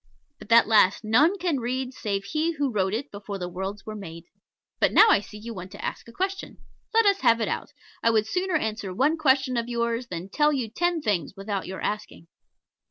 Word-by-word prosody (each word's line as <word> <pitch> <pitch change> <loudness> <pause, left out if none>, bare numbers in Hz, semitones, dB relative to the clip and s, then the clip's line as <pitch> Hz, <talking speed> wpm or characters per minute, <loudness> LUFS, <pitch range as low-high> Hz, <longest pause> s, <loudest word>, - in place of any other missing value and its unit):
But - - -13
that 230 0 +6
last 210 -2 +4
none 290 - +4
can 345 -6 0
read 255 +2 -3
save 200 -5 -3
He 310 +10 -1
who 285 -4 -1
wrote 190 -3 0
it 275 +5 -5
before 200 0 -6
the 180 -2 -4
worlds 190 +3 -5
were 215 - -6
made. 165 -6 -8 0.6
But - - +3
now 445 - +7
I - - +5
see 210 +1 -11
you 230 +2 -7
want 185 -2 -8
to 205 - -7
ask - - -5
a - - -11
question. 385 +8 -4 0.3
Let 455 -1 +4
us 400 -1 +3
have 230 0 +4
it 225 - 0
out. - - -3 0.3
I 230 - +3
would 220 -2 +2
sooner 365 +8 -1
answer 215 -8 -2
one 290 - +3
question 265 -4 +2
of 235 0 -2
yours 235 0 -1
than 180 0 -6
tell 295 +8 +3
you 255 -6 -2
ten 345 +3 0
things 190 - -1
without 195 -1 -4
your 190 - -6
asking. 210 -5 -4
230 Hz, 220 wpm, -25 LUFS, 200-290 Hz, 0.6 s, now